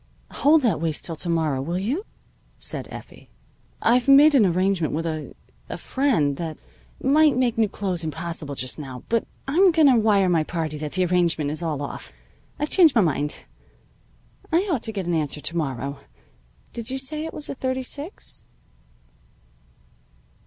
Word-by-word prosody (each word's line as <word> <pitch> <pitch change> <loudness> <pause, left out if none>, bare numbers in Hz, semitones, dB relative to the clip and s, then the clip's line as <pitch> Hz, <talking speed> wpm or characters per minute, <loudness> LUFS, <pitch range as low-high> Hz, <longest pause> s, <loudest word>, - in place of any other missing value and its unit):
"Hold 300 +1 +4
that 195 -11 +1
waist 160 -2 -2
till 165 - -3
to 170 - -5
morrow, 155 -5 0
will 170 +6 -2
you?" 265 - -2 0.5
said - - -2
Effie. - - -11 0.5
"I've 245 +3 +3
made 285 +3 +7
an 235 -8 +5
arrangement 185 -2 +1
with 165 +1 -2
a 155 -2 -4 0.4
friend 215 - 0
that 160 -3 -5 0.5
might 295 +1 +4
make 250 -3 +1
new 220 -2 +2
clothes 185 -4 -3
impossible 160 -2 -5
just 130 +3 -2
now. 130 -4 -8
But 230 -1 0 0.2
I'm 360 +8 +5
going 320 -2 +4
to 260 - +6
wire 210 -3 +3
my 170 -3 +2
party 155 -2 -4
that 150 -1 -5
the 185 0 +2
arrangement 170 -4 +1
is 155 - -3
all 155 -4 -2
off. 140 - -7 0.5
I've 295 +1 -2
changed 330 -8 +5
my 225 - +6
mind. 150 -4 -1 1.1
I 350 +5 +2
ought 275 -8 0
to 225 - -2
get 195 -4 -4
an 175 - -1
answer 150 -2 -1
to 170 - -4
morrow. 140 -3 -3 0.7
Did 230 0 -3
you 265 - -2
say 300 +4 -5
it 320 - -5
was 300 - -7
a - - -4
thirty 260 -1 -2
six?" 290 +8 -8
185 Hz, 170 wpm, -23 LUFS, -, 1.1 s, made